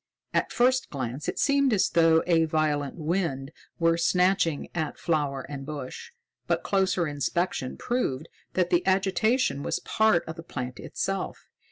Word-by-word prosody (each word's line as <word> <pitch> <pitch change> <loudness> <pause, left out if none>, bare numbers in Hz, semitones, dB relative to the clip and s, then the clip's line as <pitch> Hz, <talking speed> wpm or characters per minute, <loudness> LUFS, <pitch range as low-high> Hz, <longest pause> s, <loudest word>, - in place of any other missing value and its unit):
At - - +1
first 255 +2 +2
glance 130 0 -4
it - - -4
seemed 280 -2 +3
as 200 - +3
though 165 -1 +4
a 165 -2 +3
violent 150 -3 0
wind 160 -5 -2 0.3
were 165 0 +2
snatching 180 -3 +2
at 160 -3 -3
flower 145 -5 -1
and 140 -1 -6
bush, 145 - -7 0.4
but - - 0
closer 190 -3 +1
inspection 145 -1 -2
proved 160 - -2 0.3
that 180 -1 +1
the 175 0 +3
agitation 195 - +2
was - - -1
part 220 -6 +2
of 160 +1 -6
the - - -6
plant 125 -6 -6
itself. 195 -1 -4
165 Hz, 150 wpm, -27 LUFS, 145-190 Hz, 0.4 s, though